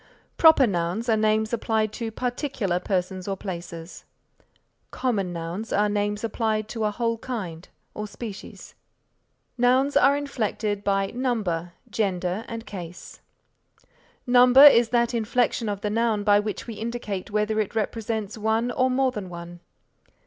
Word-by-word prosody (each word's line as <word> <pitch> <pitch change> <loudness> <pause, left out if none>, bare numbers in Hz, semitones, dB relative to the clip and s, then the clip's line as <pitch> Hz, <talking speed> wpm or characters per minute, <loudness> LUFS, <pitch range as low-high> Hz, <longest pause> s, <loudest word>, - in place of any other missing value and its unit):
Proper 320 -5 +7
nouns 185 +3 -2
are 225 - +4
names 215 +1 +1
applied 220 -2 0
to 230 0 -4
particular 245 - -2
persons 185 0 -2
or 195 -1 -2
places. 170 -3 -7 0.9
Common 205 -8 -1
nouns 170 +6 -5
are 210 +1 +2
names 205 +1 -1
applied 220 -1 -1
to 225 -2 -2
a - - +2
whole 230 +1 -2
kind 190 -11 -6 0.2
or 210 0 -5
species. 205 -1 -9 0.9
Nouns 260 +3 +3
are 275 +2 +5
inflected 215 -7 -2
by 195 -1 0
number, 205 -10 -2
gender 195 -2 -2
and 230 0 -6
case. 175 -3 -9 1.0
Number 250 +2 +7
is 240 -5 +8
that 235 0 +1
inflection 235 0 0
of 200 -1 -4
the 210 - -2
noun 225 -2 +1
by 205 0 +5
which 210 -1 -4
we 230 - -6
indicate 220 -3 -5
whether 210 +1 0
it 215 +1 -2
represents 220 -1 -3
one 220 +3 +1
or 255 +1 +1
more 260 0 +2
than 205 -6 -6
one. 175 0 -9
215 Hz, 140 wpm, -25 LUFS, 195-235 Hz, 1.0 s, is